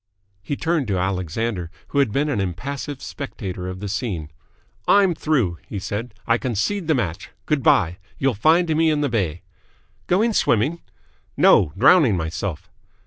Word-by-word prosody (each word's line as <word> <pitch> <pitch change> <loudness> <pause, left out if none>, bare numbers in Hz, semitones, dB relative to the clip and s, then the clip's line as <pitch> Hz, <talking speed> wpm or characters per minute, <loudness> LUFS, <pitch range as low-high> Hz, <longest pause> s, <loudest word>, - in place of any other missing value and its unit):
He 100 +9 -3
turned 160 -4 0
to 100 -3 0
Alexander, 95 +1 -2 0.2
who 140 - 0
had 135 -6 +3
been 140 +6 +1
an 125 -9 0
impassive 135 - -5
spectator 95 -9 -6
of 95 +1 -6
the 105 - -4
scene. 95 - -3 0.6
"I'm 195 -3 +5
through!" 130 - 0
he 105 - -5
said. 105 +4 -5
"I 115 0 +2
concede 130 - -1
the 160 - +3
match. 100 -3 -3 0.2
Good 150 -3 +1
bye. 90 -6 +3 0.2
You'll 135 -1 +1
find 160 - +3
me 160 +1 +3
in 150 -1 +1
the 145 - +1
bay!" 90 -8 -1 0.6
"Going 220 +6 +2
swimming?" 145 - +1 0.6
"No. 80 -7 +5
Drowning 135 - +5
myself." 80 +1 -4
115 Hz, 155 wpm, -22 LUFS, 95-150 Hz, 0.6 s, I'm